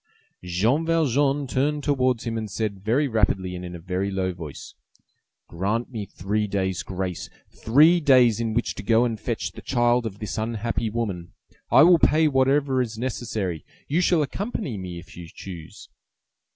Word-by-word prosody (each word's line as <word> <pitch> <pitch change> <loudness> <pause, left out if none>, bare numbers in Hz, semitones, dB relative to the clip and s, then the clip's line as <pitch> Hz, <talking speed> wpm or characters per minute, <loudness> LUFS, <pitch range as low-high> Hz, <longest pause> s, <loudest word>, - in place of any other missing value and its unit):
Jean 105 - +1
Valjean 145 -3 +1
turned 145 +3 -1
towards 130 -4 +1
him 115 -1 -3
and 110 -1 -4
said 100 -1 -3
very 125 +8 +2
rapidly 95 -6 0
and 90 - -7
in 90 0 -7
a - - -8
very 90 +3 -2
low 95 -1 -1
voice:— 80 -5 -9 0.7
"Grant 105 +9 -2
me 105 -5 -5
three 105 +4 -2
days' 95 -2 -1
grace! 95 -2 -4 0.2
three 155 +9 +4
days 125 -7 +5
in 115 -2 -2
which 120 - 0
to - - -7
go 115 +3 +3
and 115 -3 -2
fetch 110 -6 -3
the - - -11
child 120 -1 +1
of 100 -2 -8
this 105 +1 -4
unhappy 115 0 -2
woman. 100 -7 -4 0.4
I - - +7
will 175 0 +6
pay 155 +1 +4
whatever 135 -1 +2
is 115 -3 -4
necessary. 110 - -3 0.2
You 160 +5 +1
shall 175 -3 +3
accompany 190 - -4
me 90 -3 -6
if 85 +1 -12
you 85 -1 -9
choose." 85 -5 -10
115 Hz, 170 wpm, -24 LUFS, 95-135 Hz, 0.7 s, I